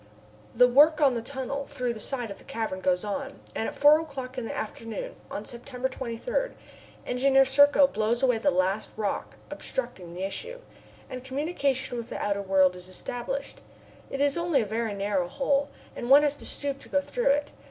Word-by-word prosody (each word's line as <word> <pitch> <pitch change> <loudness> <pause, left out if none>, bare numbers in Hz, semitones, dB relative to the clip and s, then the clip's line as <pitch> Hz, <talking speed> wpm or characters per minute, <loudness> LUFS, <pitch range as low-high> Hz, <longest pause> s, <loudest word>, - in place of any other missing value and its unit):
The 250 +1 +7
work 300 +5 +6
on 280 -4 +5
the 235 - -2
tunnel 270 +2 -4
through 250 -1 -2
the 220 - -9
side 240 -1 -3
of - - -9
the - - -16
cavern 220 -5 -3
goes 180 +2 +1
on, 270 +7 -4 0.2
and 225 - -1
at - - -10
four 295 +2 +7
o'clock 265 -5 -7
in 250 - -3
the - - -5
afternoon 220 0 -5
on 205 - -5
September 250 +1 -4
23, 265 - -3 0.5
Engineer 270 +2 +4
Serko 285 +2 +6
blows 235 0 0
away 250 -4 +3
the 285 - +3
last 190 -1 0
rock 210 -2 -2 0.2
obstructing 180 - -4
the 185 - -4
issue, 475 - -5 0.5
and 255 -1 -7
communication 265 -2 -1
with 235 +1 -7
the - - -4
outer 200 -1 0
world 190 -2 +3
is 180 0 -9
established. 245 - -5 0.5
It 275 - -3
is 285 +3 +2
only 340 -6 +2
a - - -1
very 220 0 -2
narrow 200 -3 0
hole, 280 +6 0 0.3
and 240 - -5
one 285 +2 +8
has 290 -1 +3
to - - -7
stoop 280 -1 -2
to - - -14
go 285 - +3
through 485 - -2
it. 290 +1 +1
255 Hz, 195 wpm, -27 LUFS, 215-280 Hz, 0.5 s, one